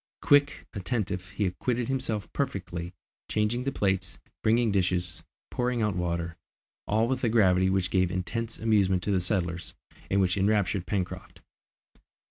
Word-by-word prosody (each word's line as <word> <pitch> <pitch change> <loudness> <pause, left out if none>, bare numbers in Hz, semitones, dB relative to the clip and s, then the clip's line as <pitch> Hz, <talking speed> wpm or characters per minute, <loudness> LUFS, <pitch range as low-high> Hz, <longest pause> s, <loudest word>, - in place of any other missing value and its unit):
Quick, 145 0 +4
attentive, 95 -3 -2
he 105 -1 -1
acquitted 115 +6 -1
himself 130 -6 -2
perfectly, 90 -9 -3 0.4
changing 110 +4 0
the 135 - 0
plates, 95 -5 -1 0.2
bringing 115 0 +3
dishes, 90 -3 0 0.3
pouring 125 -2 0
out 105 -3 0
water, 85 -1 -2 0.5
all 110 +2 +2
with 130 +1 -1
a 120 - +3
gravity 95 -4 +4
which 95 -1 +1
gave 95 -2 +3
intense 110 +5 -3
amusement 100 -5 +2
to 105 - 0
the 95 - +3
settlers, 90 -2 -2 0.3
and 100 - +2
which 95 0 +2
enraptured 100 -2 +1
Pencroft. 95 -2 -4
100 Hz, 140 wpm, -28 LUFS, 90-115 Hz, 0.5 s, Quick